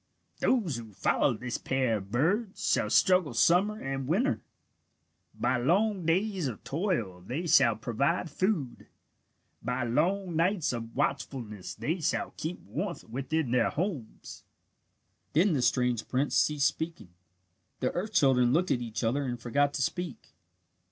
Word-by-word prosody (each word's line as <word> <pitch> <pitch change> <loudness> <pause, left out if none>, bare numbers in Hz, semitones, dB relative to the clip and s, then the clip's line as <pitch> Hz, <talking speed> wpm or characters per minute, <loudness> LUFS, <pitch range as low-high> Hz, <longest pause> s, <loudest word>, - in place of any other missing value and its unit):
"Those 195 - +1
who 110 -3 -9
follow - - +2
this 125 +1 -4
pair 130 -4 0
of 100 -1 -9
birds 185 - 0
shall - - +2
struggle 180 -9 +3
summer 195 - +3
and 135 - -4
winter. 230 - +1 0.9
By 125 +1 +1
long 185 - +1
days 185 -1 +1
of 115 -5 -6
toil 135 - -2
they 130 - -4
shall 130 -8 +5
provide 135 +11 0
food. 160 - -2 0.7
By 125 +1 -2
long 170 +9 0
nights 170 -2 +1
of 115 -1 -6
watchfulness 115 -9 -3
they 165 +5 -2
shall - - -1
keep 165 +3 -4
warmth 190 -3 -4
within 135 +2 -1
their 125 -2 +3
homes." 160 - -5 0.9
Then 175 +4 +4
the 135 - +1
strange 125 -2 +1
prince 135 +3 0
ceased 150 -2 +3
speaking. 160 - -2 0.7
The - - 0
earth 205 +5 -4
children 130 -8 +4
looked 175 +6 +2
at 120 - +1
each 115 0 -4
other 135 +5 +1
and 120 -2 -3
forgot 140 +5 +1
to 135 - 0
speak. 175 -1 -4
140 Hz, 145 wpm, -29 LUFS, 120-180 Hz, 0.9 s, shall